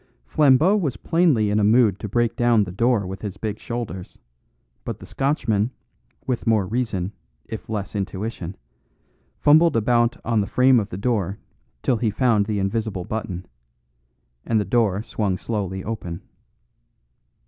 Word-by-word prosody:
Flambeau 150 - +4
was 150 - -1
plainly 145 - +2
in 105 - +2
a - - +2
mood 110 -2 +4
to 105 - -5
break 120 +2 +1
down 120 -3 +3
the 90 - -6
door 115 +2 +1
with 95 +1 -6
his 100 -2 -5
big 110 -1 -4
shoulders; 115 -6 -6 0.7
but - - -5
the - - -12
Scotchman, 120 -6 0 0.6
with 125 -3 -2
more 110 -4 +3
reason, 105 -4 -2 0.3
if 110 -1 -8
less 105 -2 -4
intuition, 95 -2 -4 0.8
fumbled 155 +2 +5
about 120 +1 +2
on 115 -3 +2
the 100 - -2
frame 125 +3 +4
of 105 -1 -3
the 90 - -6
door 100 -3 -1 0.5
till 125 - +2
he 115 -1 0
found 110 -2 +2
the 105 -2 -1
invisible 100 -1 -1
button; 95 -4 -4 1.0
and 115 -2 +1
the 105 - -1
door 105 -1 +1
swung 105 -5 -1
slowly 95 -3 -3
open. 90 -6 -5
110 Hz, 150 wpm, -23 LUFS, 100-120 Hz, 1.0 s, fumbled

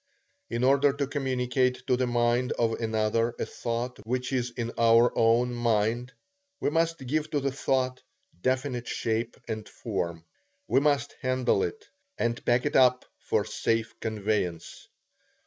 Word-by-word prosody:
In 120 - -2
order 140 +2 +4
to 140 0 -1
communicate 130 -2 0
to 125 - +3
the 125 0 0
mind 120 +1 +1
of 115 -1 +1
another 110 +1 0
a - - -2
thought 120 +2 -4
which 125 +4 -2
is 125 -1 0
in 120 -1 -4
our 115 +1 +5
own 115 +2 +3
mind, 120 +1 0 0.5
we - - 0
must 165 -2 0
give 155 +4 -1
to 145 - 0
the 140 0 -1
thought 130 -1 0 0.4
definite 130 0 -1
shape 115 +1 -2
and 110 -2 -5
form. 85 -1 -4 0.4
We - - +4
must 145 -3 +1
handle 130 -1 +1
it, 435 -1 -3 0.3
and 115 0 -1
pack 120 +1 +2
it - - -1
up 125 -1 +5
for - - 0
safe 115 0 -1
conveyance. 105 -6 -2
125 Hz, 145 wpm, -28 LUFS, 115-130 Hz, 0.5 s, our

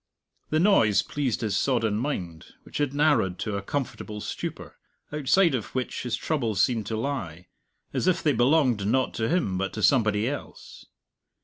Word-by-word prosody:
The 155 - +1
noise 160 - +4
pleased 135 -6 -2
his 105 -3 -1
sodden 110 -2 +1
mind, 90 - -4
which - - -7
had 145 -2 +1
narrowed 140 -11 +2
to 105 -2 -3
a 100 - -2
comfortable 110 -2 -4
stupor - - -6 0.3
outside 150 +4 +3
of 125 -2 -4
which 130 -1 -2
his 125 -2 -2
troubles 115 -10 0
seemed 115 -5 0
to 110 - -2
lie, 95 - -4 0.4
as - - -1
if 185 - +2
they 150 - +3
belonged 125 -4 +3
not 130 +3 +1
to 110 - -1
him 150 - 0
but 95 0 -2
to - - -4
somebody 110 -5 +3
else. 145 +1 -7
120 Hz, 170 wpm, -26 LUFS, 105-145 Hz, 0.4 s, noise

